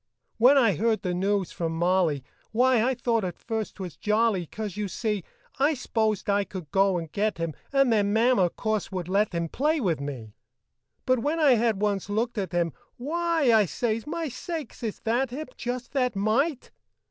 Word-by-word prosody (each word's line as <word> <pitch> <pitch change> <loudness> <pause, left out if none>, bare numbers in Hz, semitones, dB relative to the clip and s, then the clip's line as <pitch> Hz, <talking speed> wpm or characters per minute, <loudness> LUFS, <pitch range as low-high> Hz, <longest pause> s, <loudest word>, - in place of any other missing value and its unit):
When 255 +5 +7
I 230 -6 +5
heard 225 0 +1
the 180 -2 -1
news 195 +1 0
from 165 -1 -3
Molly, 170 -5 +2 0.3
Why, 250 +1 +4
I 260 +2 +1
thought 230 -2 0
at 180 -2 -4
first 220 -2 -4
't 195 - -6
was 180 -4 -7
jolly, 210 -4 +1
'Cause, 215 -1 -5
you 210 -1 -2
see, 210 0 -2 0.4
I 295 +3 +3
s'posed 220 -5 -1
I 200 0 +2
could 180 -6 -8
go 195 -1 +3
and 165 -2 -6
get 210 -1 0
him 165 -2 -2 0.2
And 275 -3 +4
then 205 -2 +2
Mama, 225 -4 +3
course, 215 +3 -2
would 180 -3 -4
let 200 +3 +2
him 170 -1 -1
Play 300 - 0
with 175 - 0
me. 125 -7 -6 0.7
But 255 -1 +3
when 295 +7 -1
I 300 -4 +5
had 225 -4 +2
once 200 -2 0
looked 225 +2 -1
at 195 -1 -3
him, 170 -3 0 0.2
"Why!" 320 -1 +1
I 215 -2 +5
says, 225 - -2
"My 330 +1 -2
sakes, 315 +4 -6
is 225 -3 -4
that 240 +3 0
him? 280 +3 -6
Just 245 0 -4
that 250 -5 0
mite!" 245 +8 0
215 Hz, 195 wpm, -26 LUFS, 190-250 Hz, 0.7 s, When